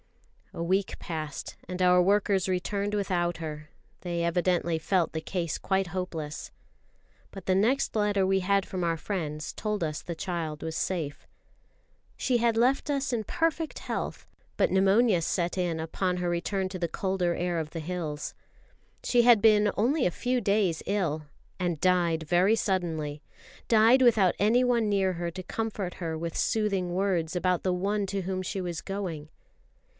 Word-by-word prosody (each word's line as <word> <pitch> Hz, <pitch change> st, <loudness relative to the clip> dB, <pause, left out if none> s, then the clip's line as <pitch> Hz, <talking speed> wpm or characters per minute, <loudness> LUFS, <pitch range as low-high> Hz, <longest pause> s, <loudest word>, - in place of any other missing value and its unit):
A 170 Hz, -, -4 dB
week 190 Hz, +3 st, 0 dB
passed 155 Hz, -4 st, -5 dB
and 180 Hz, 0 st, -4 dB
our 180 Hz, 0 st, +6 dB
workers 195 Hz, 0 st, +2 dB
returned 200 Hz, +3 st, -1 dB
without 175 Hz, -4 st, 0 dB
her; 155 Hz, -2 st, -6 dB, 0.3 s
they 170 Hz, -1 st, -2 dB
evidently 170 Hz, -1 st, +1 dB
felt 180 Hz, 0 st, +1 dB
the 160 Hz, -, -3 dB
case 170 Hz, -2 st, -2 dB
quite 190 Hz, -1 st, 0 dB
hopeless. 165 Hz, -4 st, -5 dB, 0.8 s
But 195 Hz, -2 st, -10 dB
the 185 Hz, -, +2 dB
next 230 Hz, +8 st, +2 dB
letter 205 Hz, -2 st, +2 dB
we 190 Hz, 0 st, +2 dB
had 195 Hz, +1 st, +2 dB
from 185 Hz, -2 st, -4 dB
our 165 Hz, -1 st, +1 dB
friends 155 Hz, -5 st, -4 dB
told 210 Hz, -1 st, -2 dB
us 155 Hz, -2 st, -2 dB
the 170 Hz, -, -6 dB
child 165 Hz, -4 st, -4 dB
was 160 Hz, 0 st, -4 dB
safe. 160 Hz, -5 st, -3 dB, 0.9 s
She 250 Hz, -2 st, +1 dB
had 230 Hz, -1 st, +2 dB
left 260 Hz, +5 st, +2 dB
us 275 Hz, -2 st, 0 dB
in 225 Hz, -2 st, 0 dB
perfect 325 Hz, -, -1 dB
health, -, -, -4 dB, 0.3 s
but -, -, +2 dB
pneumonia 195 Hz, +1 st, +4 dB
set 175 Hz, +2 st, -1 dB
in 175 Hz, -3 st, 0 dB
upon 180 Hz, +3 st, -1 dB
her 180 Hz, -1 st, -1 dB
return 185 Hz, +3 st, -1 dB
to 185 Hz, -1 st, -6 dB
the 170 Hz, -1 st, -1 dB
colder 185 Hz, -1 st, 0 dB
air 175 Hz, 0 st, -1 dB
of 160 Hz, -2 st, -2 dB
the 165 Hz, -, -6 dB
hills. 155 Hz, -3 st, -4 dB, 0.7 s
She 245 Hz, -, +4 dB
had 235 Hz, -2 st, +7 dB
been 210 Hz, -1 st, +5 dB
only 255 Hz, +7 st, +2 dB
a 180 Hz, -, +2 dB
few 250 Hz, +6 st, -1 dB
days 200 Hz, -5 st, +1 dB
ill, 160 Hz, -7 st, -1 dB, 0.3 s
and 175 Hz, -4 st, -1 dB
died 175 Hz, -3 st, +2 dB
very 180 Hz, +7 st, +3 dB
suddenly 160 Hz, -7 st, -1 dB, 0.5 s
died 230 Hz, +3 st, +6 dB
without 215 Hz, -7 st, +5 dB
anyone 235 Hz, +1 st, +3 dB
near 195 Hz, -2 st, +2 dB
her 170 Hz, 0 st, -3 dB
to 185 Hz, +2 st, -7 dB
comfort 210 Hz, -3 st, -3 dB
her 165 Hz, -3 st, -4 dB
with 165 Hz, 0 st, -4 dB
soothing 200 Hz, -5 st, 0 dB
words 180 Hz, -3 st, 0 dB
about 180 Hz, 0 st, +1 dB
the 185 Hz, -, +1 dB
One 200 Hz, +3 st, 0 dB
to 195 Hz, 0 st, -2 dB
whom 185 Hz, +1 st, -2 dB
she 190 Hz, +1 st, -3 dB
was 175 Hz, -3 st, -4 dB
going. 180 Hz, -7 st, -5 dB
185 Hz, 165 wpm, -28 LUFS, 170-205 Hz, 0.9 s, had